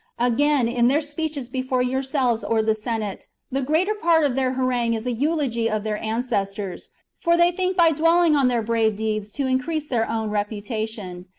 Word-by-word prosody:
Again, 255 Hz, +2 st, +2 dB
in 240 Hz, 0 st, +2 dB
their 280 Hz, +4 st, +3 dB
speeches 295 Hz, -3 st, -4 dB
before 255 Hz, 0 st, -1 dB
yourselves 260 Hz, -2 st, 0 dB
or 225 Hz, -1 st, +1 dB
the 220 Hz, 0 st, +2 dB
Senate, 215 Hz, -2 st, -4 dB, 0.2 s
the 270 Hz, +1 st, -1 dB
greater 320 Hz, +10 st, +1 dB
part 335 Hz, -6 st, +2 dB
of 285 Hz, -3 st, +2 dB
their 260 Hz, 0 st, 0 dB
harangue 250 Hz, -3 st, 0 dB
is 220 Hz, +1 st, -5 dB
a 250 Hz, -, 0 dB
eulogy 255 Hz, -3 st, 0 dB
of 215 Hz, -1 st, -2 dB
their 215 Hz, -1 st, -3 dB
ancestors; 210 Hz, -4 st, -3 dB, 0.3 s
for 340 Hz, 0 st, +2 dB
they 345 Hz, +1 st, +5 dB
think 370 Hz, +1 st, -2 dB
by 335 Hz, -2 st, +6 dB
dwelling 330 Hz, +1 st, +3 dB
on 275 Hz, -3 st, +3 dB
their 240 Hz, -2 st, +1 dB
brave 220 Hz, -1 st, +1 dB
deeds 215 Hz, -1 st, -2 dB
to 280 Hz, -, -2 dB
increase 290 Hz, +4 st, -1 dB
their 230 Hz, -4 st, 0 dB
own 220 Hz, -1 st, -2 dB
reputation. 210 Hz, -3 st, -4 dB
250 Hz, 185 wpm, -23 LUFS, 220-295 Hz, 0.3 s, by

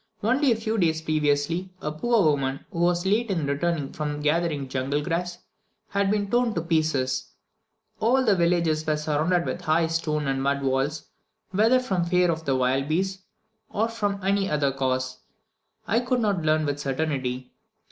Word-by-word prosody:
Only 260 Hz, +5 st, +3 dB
a -, -, +4 dB
few 220 Hz, 0 st, -2 dB
days 160 Hz, -3 st, +2 dB
previously, 155 Hz, +3 st, 0 dB
a 150 Hz, -, -3 dB
poor 225 Hz, +7 st, +2 dB
woman 140 Hz, -3 st, 0 dB
who 170 Hz, -, -5 dB
was 175 Hz, +1 st, +2 dB
late 215 Hz, +4 st, +1 dB
in 170 Hz, -6 st, 0 dB
returning 145 Hz, 0 st, -1 dB
from 150 Hz, -1 st, -3 dB
gathering 150 Hz, -2 st, 0 dB
jungle 135 Hz, +3 st, -1 dB
grass, 175 Hz, +2 st, -2 dB, 0.5 s
had 200 Hz, 0 st, +1 dB
been 205 Hz, -1 st, 0 dB
torn 240 Hz, -2 st, +2 dB
to 165 Hz, -, 0 dB
pieces. 155 Hz, -6 st, 0 dB, 0.7 s
All 255 Hz, +4 st, +3 dB
the 210 Hz, -4 st, +4 dB
villages 170 Hz, -3 st, +2 dB
were 155 Hz, -1 st, +2 dB
surrounded 155 Hz, +4 st, +1 dB
with -, -, -3 dB
high 160 Hz, +2 st, +2 dB
stone 160 Hz, -2 st, -1 dB
and 135 Hz, -1 st, -1 dB
mud 140 Hz, 0 st, 0 dB
walls, 135 Hz, +3 st, 0 dB, 0.5 s
whether 225 Hz, +6 st, +4 dB
from 190 Hz, -9 st, -1 dB
fear 180 Hz, 0 st, +3 dB
of 160 Hz, 0 st, -4 dB
the 135 Hz, -2 st, +1 dB
wild 130 Hz, +2 st, +1 dB
beasts, 190 Hz, +4 st, -1 dB, 0.5 s
or 220 Hz, +2 st, 0 dB
from 205 Hz, -3 st, -2 dB
any 195 Hz, 0 st, +1 dB
other 145 Hz, -2 st, +1 dB
cause, 130 Hz, -1 st, -2 dB, 0.7 s
I 225 Hz, -, +3 dB
could 250 Hz, +1 st, 0 dB
not 205 Hz, -6 st, +1 dB
learn 155 Hz, 0 st, +2 dB
with 145 Hz, 0 st, -2 dB
certainty. 135 Hz, -3 st, -2 dB
160 Hz, 170 wpm, -25 LUFS, 145-195 Hz, 0.7 s, a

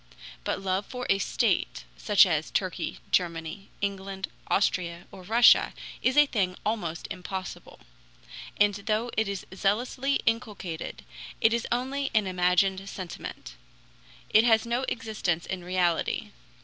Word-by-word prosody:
But -, -, -1 dB
love 195 Hz, +1 st, -1 dB
for 250 Hz, -1 st, -5 dB
a 195 Hz, -, +3 dB
state, 185 Hz, -, 0 dB
such -, -, +5 dB
as -, -, 0 dB
Turkey, -, -, -2 dB
Germany, 170 Hz, +2 st, -1 dB
England, 195 Hz, -1 st, -3 dB, 0.2 s
Austria, 175 Hz, -3 st, 0 dB
or 190 Hz, -, -11 dB
Russia 225 Hz, +6 st, +5 dB, 0.3 s
is 260 Hz, +2 st, +1 dB
a 295 Hz, -, +8 dB
thing 190 Hz, -9 st, -1 dB
almost 190 Hz, -7 st, -2 dB
impossible. 185 Hz, +1 st, -6 dB, 0.8 s
And 205 Hz, 0 st, +5 dB
though 215 Hz, +4 st, -1 dB
it 220 Hz, -1 st, +1 dB
is 200 Hz, -2 st, -4 dB
zealously 245 Hz, +8 st, 0 dB
inculcated, 210 Hz, -8 st, -2 dB, 0.4 s
it 225 Hz, -, +4 dB
is 235 Hz, -1 st, -1 dB
only 265 Hz, +3 st, -1 dB
an 215 Hz, -2 st, +4 dB
imagined 185 Hz, +1 st, +1 dB
sentiment; 180 Hz, -, -7 dB, 0.8 s
it 220 Hz, -, +7 dB
has 225 Hz, -2 st, +4 dB
no 240 Hz, +3 st, 0 dB
existence 210 Hz, -7 st, -2 dB
in 185 Hz, -2 st, -4 dB
reality. 175 Hz, -2 st, 0 dB
195 Hz, 130 wpm, -27 LUFS, 180-225 Hz, 0.8 s, a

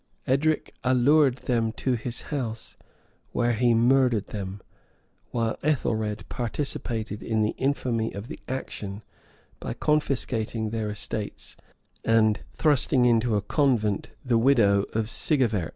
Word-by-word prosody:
Edric 150 Hz, +4 st, +1 dB
allured 130 Hz, +2 st, +4 dB
them 115 Hz, -3 st, +1 dB
into 115 Hz, +3 st, -1 dB
his 120 Hz, 0 st, -3 dB
house, 115 Hz, -5 st, -4 dB, 0.6 s
where 120 Hz, 0 st, +2 dB
he 120 Hz, +1 st, +3 dB
murdered 120 Hz, -2 st, +3 dB
them; 100 Hz, -1 st, -5 dB, 0.7 s
while 115 Hz, -2 st, -1 dB
Ethelred 110 Hz, -8 st, -1 dB
participated 115 Hz, -4 st, -3 dB
in 110 Hz, -1 st, 0 dB
the 105 Hz, -, +1 dB
infamy 125 Hz, -5 st, 0 dB
of 100 Hz, +3 st, -7 dB
the 160 Hz, -, -8 dB
action, 105 Hz, -5 st, -5 dB, 0.6 s
by -, -, -4 dB
confiscating 120 Hz, -7 st, 0 dB
their 110 Hz, -2 st, -2 dB
estates, 105 Hz, 0 st, -5 dB, 0.5 s
and 110 Hz, -1 st, +3 dB, 0.2 s
thrusting 140 Hz, -4 st, +3 dB
into 115 Hz, -1 st, +3 dB
a 100 Hz, -, 0 dB
convent 110 Hz, -5 st, +1 dB, 0.2 s
the 120 Hz, -2 st, +3 dB
widow 110 Hz, -6 st, +4 dB
of 110 Hz, -1 st, 0 dB
Sigefert. 115 Hz, -, +1 dB
115 Hz, 120 wpm, -26 LUFS, 110-130 Hz, 0.7 s, allured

